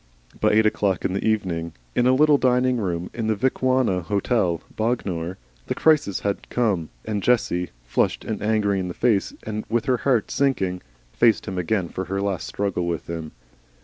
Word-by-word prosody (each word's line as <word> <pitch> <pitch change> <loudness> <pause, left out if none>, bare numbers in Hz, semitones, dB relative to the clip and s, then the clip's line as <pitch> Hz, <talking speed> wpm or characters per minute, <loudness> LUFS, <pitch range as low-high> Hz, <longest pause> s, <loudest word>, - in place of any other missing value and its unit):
By - - +3
eight 110 +1 +5
o'clock 100 -3 +1
in - - 0
the 100 - -2
evening, 90 -7 -1 0.2
in 120 - +2
a 130 - +5
little 150 0 +5
dining 125 0 +3
room 90 -5 -2
in 115 -2 -3
the 110 - +2
Vicuna 130 -4 +1
Hotel, 95 -1 0 0.2
Bognor, 95 -7 -2 0.3
the - - -1
crisis 150 -11 +3
had 100 -1 -3
come, 100 -10 0 0.2
and 105 -2 -2
Jessie, 100 -7 +1 0.2
flushed - - 0
and 110 -2 -3
angry 105 -2 +1
in 90 - -2
the 90 - -6
face 110 -5 +2
and 110 0 -4
with 115 0 0
her 130 -2 +2
heart 120 -4 +1
sinking, 95 -10 0 0.3
faced 115 -2 +3
him 95 -1 -3
again 90 +1 0
for 95 +2 -5
her 95 +2 -2
last 100 -4 -2
struggle 100 -3 -2
with 85 -2 -2
him. 80 -2 -6
100 Hz, 180 wpm, -23 LUFS, 90-120 Hz, 0.3 s, eight